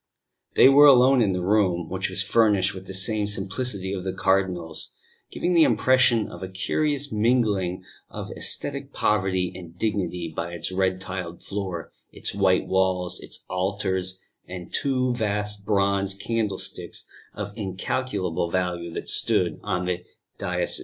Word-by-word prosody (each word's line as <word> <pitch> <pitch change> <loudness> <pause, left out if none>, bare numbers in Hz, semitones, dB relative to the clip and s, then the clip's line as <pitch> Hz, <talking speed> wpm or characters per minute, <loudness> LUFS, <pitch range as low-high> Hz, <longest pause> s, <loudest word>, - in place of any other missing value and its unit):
They - - +8
were 145 +2 +8
alone 130 -1 +6
in 105 -4 +3
the 90 -1 -2
room, 90 -4 +2
which 95 +1 -2
was 95 +1 -1
furnished 100 -2 +3
with 95 0 -10
the 95 - -6
same 105 +2 +1
simplicity 100 0 -1
as 95 -2 -4
the 95 - -2
Cardinal's 95 -4 -1 0.3
giving 180 - -1
the 170 - +5
impression 125 -6 +4
of 85 - -10
a 95 - -4
curious 145 +9 -1
mingling 105 -5 +1 0.3
of - - -7
ascetic 140 -1 -1
poverty 95 -3 +1
and 85 -2 -11
dignity 90 -6 -2
by 85 +1 -3
its 85 +1 -4
red 95 0 0
tiled 90 -2 -6
floor, 95 -5 -4 0.2
its - - -5
white 95 -2 +2
walls, 95 -1 0
its - - -7
altar 95 +1 -1 0.5
and 90 -1 -8
two 130 -2 +1
vast 105 -2 -2
bronze 100 -1 +1
candlesticks 105 -1 -3 0.3
of 105 -1 -5
incalculable 95 -3 -2
value 90 -1 -2
that - - -5
stood - - +2
on 90 -3 -2
the 90 0 -2 0.4
dais. - - -1
95 Hz, 145 wpm, -25 LUFS, 90-110 Hz, 0.5 s, They